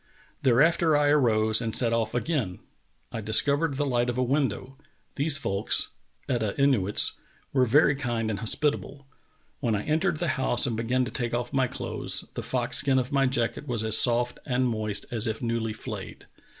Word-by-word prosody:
Thereafter 150 Hz, +5 st, +3 dB
I 145 Hz, 0 st, +2 dB
arose 110 Hz, -6 st, +3 dB
and 110 Hz, -1 st, -3 dB
set 115 Hz, -2 st, +4 dB
off 115 Hz, -1 st, -1 dB
again.... 120 Hz, -, -2 dB, 0.5 s
I 115 Hz, -, -5 dB
discovered 140 Hz, +7 st, +2 dB
the 145 Hz, -, 0 dB
light 120 Hz, -2 st, 0 dB
of 120 Hz, -, -3 dB
a 130 Hz, -, +1 dB
window\... 135 Hz, -1 st, -2 dB, 0.4 s
These 145 Hz, +1 st, +4 dB
folks 100 Hz, -3 st, +1 dB, 0.4 s
[Etah 115 Hz, -6 st, -1 dB
Inuits] 125 Hz, -8 st, +2 dB, 0.4 s
w^ere 130 Hz, -2 st, +3 dB
very 145 Hz, +4 st, +4 dB
kind 120 Hz, -5 st, -2 dB
and 105 Hz, -, -4 dB
hospitable. 140 Hz, +3 st, -2 dB, 0.5 s
When 115 Hz, -5 st, 0 dB
I 105 Hz, -, -3 dB
entered 155 Hz, +2 st, 0 dB
the 175 Hz, -, -2 dB
liouse 130 Hz, -2 st, +1 dB
and 120 Hz, -4 st, -1 dB
began 125 Hz, +3 st, 0 dB
to -, -, -7 dB
take 120 Hz, -2 st, -2 dB
off 120 Hz, 0 st, -4 dB
my 135 Hz, -1 st, +2 dB
clothes -, -, -3 dB
the -, -, -5 dB
fox -, -, -2 dB
skin 135 Hz, -1 st, +1 dB
of 130 Hz, +2 st, -1 dB
my 135 Hz, -1 st, +2 dB
jacket 125 Hz, +3 st, -2 dB
was 120 Hz, -4 st, -2 dB
as 110 Hz, -1 st, +5 dB
soft 120 Hz, 0 st, +2 dB
and 125 Hz, -1 st, 0 dB
moist 110 Hz, -3 st, -2 dB
as 115 Hz, -1 st, 0 dB
if 110 Hz, -1 st, -3 dB
newly 115 Hz, -1 st, -2 dB
flayed. 105 Hz, -, -8 dB
125 Hz, 180 wpm, -26 LUFS, 115-140 Hz, 0.5 s, as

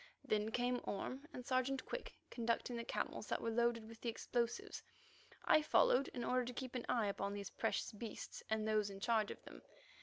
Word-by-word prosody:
Then 215 Hz, 0 st, +1 dB
came 245 Hz, +2 st, +1 dB
Orme 260 Hz, +8 st, -3 dB
and 250 Hz, -5 st, -7 dB
Sergeant 260 Hz, +1 st, +1 dB
Quick, -, -, -4 dB, 0.2 s
conducting 235 Hz, +1 st, 0 dB
the 235 Hz, -, -2 dB
camels -, -, -2 dB
that -, -, 0 dB
were 230 Hz, -, -1 dB
loaded 235 Hz, -1 st, +2 dB
with 225 Hz, 0 st, -11 dB
the 240 Hz, -, 0 dB
explosives. 240 Hz, -, -1 dB, 0.6 s
I 310 Hz, -, +7 dB
followed 275 Hz, -3 st, +5 dB
in 245 Hz, -, -4 dB
order 255 Hz, +1 st, +2 dB
to 245 Hz, +1 st, -4 dB
keep 255 Hz, 0 st, -5 dB
an 250 Hz, -2 st, -3 dB
eye 235 Hz, -3 st, +3 dB
upon 200 Hz, 0 st, -1 dB
these 200 Hz, -1 st, -5 dB
precious -, -, 0 dB
beasts 220 Hz, +1 st, -6 dB
and 220 Hz, 0 st, +1 dB
those 215 Hz, -1 st, +3 dB
in 195 Hz, 0 st, -7 dB
charge 220 Hz, 0 st, +3 dB
of -, -, -7 dB
them. -, -, -11 dB
235 Hz, 200 wpm, -39 LUFS, 220-250 Hz, 0.6 s, I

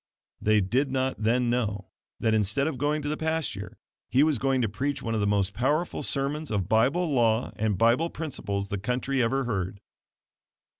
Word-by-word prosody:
They 110 Hz, 0 st, +3 dB
did 125 Hz, +9 st, +1 dB
not 130 Hz, -2 st, -1 dB
then 120 Hz, +2 st, +2 dB
know 105 Hz, -5 st, -2 dB, 0.3 s
that 110 Hz, -, +1 dB
instead 110 Hz, +5 st, +2 dB
of 145 Hz, -5 st, -2 dB
going 150 Hz, +1 st, 0 dB
to -, -, -3 dB
the 150 Hz, -, 0 dB
pasture 160 Hz, -, -3 dB, 0.3 s
he 135 Hz, +3 st, +4 dB
was 150 Hz, -5 st, +2 dB
going 135 Hz, -2 st, +1 dB
to -, -, +2 dB
preach 130 Hz, +8 st, -3 dB
one 115 Hz, -, -2 dB
of 110 Hz, -, 0 dB
the 100 Hz, -, +1 dB
most 100 Hz, -1 st, +1 dB
powerful 150 Hz, +9 st, 0 dB
sermons 145 Hz, +2 st, -2 dB
of 100 Hz, -4 st, -1 dB
Bible 135 Hz, -, +2 dB
law 115 Hz, -2 st, +2 dB
and 105 Hz, -2 st, 0 dB
Bible 120 Hz, -, +3 dB
principles 100 Hz, -12 st, -4 dB
the 100 Hz, -, -2 dB
country 125 Hz, +5 st, -1 dB
ever 135 Hz, +4 st, +1 dB
heard. 100 Hz, -4 st, -3 dB
125 Hz, 185 wpm, -27 LUFS, 105-140 Hz, 0.3 s, he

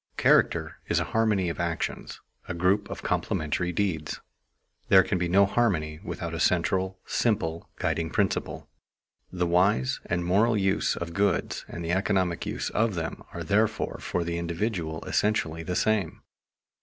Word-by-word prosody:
Character -, -, +3 dB
is -, -, +2 dB
a -, -, +1 dB
harmony 110 Hz, -5 st, +2 dB
of 85 Hz, -, -3 dB
actions, 85 Hz, -1 st, -3 dB, 0.3 s
a 90 Hz, -, -4 dB
group 95 Hz, +4 st, +1 dB
of -, -, -7 dB
complementary 80 Hz, +4 st, -1 dB
deeds. 85 Hz, -4 st, -2 dB, 0.7 s
There 95 Hz, -1 st, +8 dB
can 95 Hz, -, -1 dB
be 90 Hz, -, 0 dB
no 100 Hz, +3 st, +5 dB
harmony, 90 Hz, -9 st, 0 dB
without -, -, -5 dB
a -, -, -3 dB
central, 95 Hz, 0 st, +1 dB
simple, 85 Hz, -8 st, -1 dB
guiding 80 Hz, -1 st, -1 dB
principle. -, -, -1 dB, 0.6 s
The 90 Hz, -1 st, 0 dB
wise 85 Hz, -6 st, +2 dB
and 85 Hz, 0 st, -1 dB
moral 105 Hz, +6 st, +3 dB
use 95 Hz, -1 st, +1 dB
of 85 Hz, 0 st, -5 dB
goods 100 Hz, 0 st, 0 dB
and 85 Hz, -, -6 dB
the 85 Hz, -, -1 dB
economic 95 Hz, -2 st, 0 dB
use -, -, -3 dB
of 110 Hz, -2 st, +1 dB
them 80 Hz, -2 st, -4 dB
are -, -, -5 dB
therefore -, -, 0 dB
for 90 Hz, -, -2 dB
the 85 Hz, 0 st, -2 dB
individual 85 Hz, -2 st, -2 dB
essentially 85 Hz, -6 st, 0 dB
the 90 Hz, +2 st, -3 dB
same. 110 Hz, -5 st, 0 dB
90 Hz, 155 wpm, -27 LUFS, 85-100 Hz, 0.7 s, There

